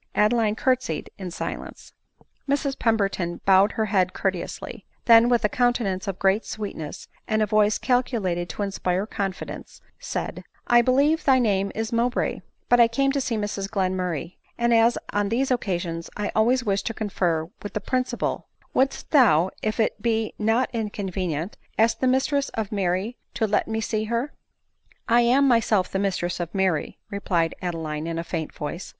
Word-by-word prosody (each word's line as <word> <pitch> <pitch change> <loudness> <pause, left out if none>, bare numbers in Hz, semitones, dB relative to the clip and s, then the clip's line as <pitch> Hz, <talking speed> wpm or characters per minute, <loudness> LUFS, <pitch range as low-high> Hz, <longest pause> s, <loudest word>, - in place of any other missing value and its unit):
Adeline 215 0 +3
curtsied 250 - -1
in 185 -2 -5
si 175 - -3
lence. - - -12 0.6
Mrs 280 -1 0
Pemberton 195 -6 0
bowed 195 +1 +5
her 220 - 0
head 190 -3 +1
courteously; 195 +3 -4 0.2
then, 230 0 +7
with 240 -3 +3
a - - +6
countenance 225 -6 0
of 195 -2 -3
great 195 +3 +2
sweetness, 195 -8 -6 0.2
and 215 -1 +2
a - - +3
voice 210 0 +3
cal 250 -1 +2
culated 185 -9 -2
to 205 - -3
inspire 190 -1 -1
confidence, 195 -4 -5 0.2
said, - - -4
" - - -32
I 240 0 +6
believe 280 +6 +3
thy 265 -2 +5
name 200 -5 +1
is 225 +1 -3
Mowbray; 240 +2 0 0.3
but 245 - +4
I 235 - +8
came 275 +4 +1
to 280 0 0
see 235 -3 -1
Mrs 205 -2 -3
Glenmurray; 185 -4 -2 0.2
and 235 0 +2
as 230 +1 +4 0.2
on 205 -1 +1
these 260 +4 0
occasions 175 -8 -2
I 210 0 -2
always 245 +4 +3
wish 200 -3 0
to 225 - -4
confer 175 -6 -1
with 205 - -7
the - - +1
principal, 255 +3 -2 0.3
wouldst 270 +1 0
thou, 190 - +5
if 215 +2 -2
it 215 -1 0
be 225 -1 0
not 225 +4 +1
inconvenient, 190 -6 -3 0.2
ask 225 0 +3
the 260 - +1
mistress 275 +2 +1
of 220 -3 -3
Mary 195 +3 -1 0.2
to 225 - +1
let 210 -1 +1
me 220 0 -2
see 215 0 -1
her."* 235 +6 -2 0.4
" - - -52 0.3
I 235 +1 +5
am 260 +4 +4
myself 225 -6 +2
the 190 - -1
mistress 180 -3 -1
of 170 -2 -3
IVfiiry," 190 -5 0
replied 175 -5 0
Adeline 160 -3 -3
in 165 0 -3
a 165 - -2
faint 165 -2 -4
voice. 170 +5 -6
210 Hz, 175 wpm, -24 LUFS, 185-235 Hz, 0.6 s, I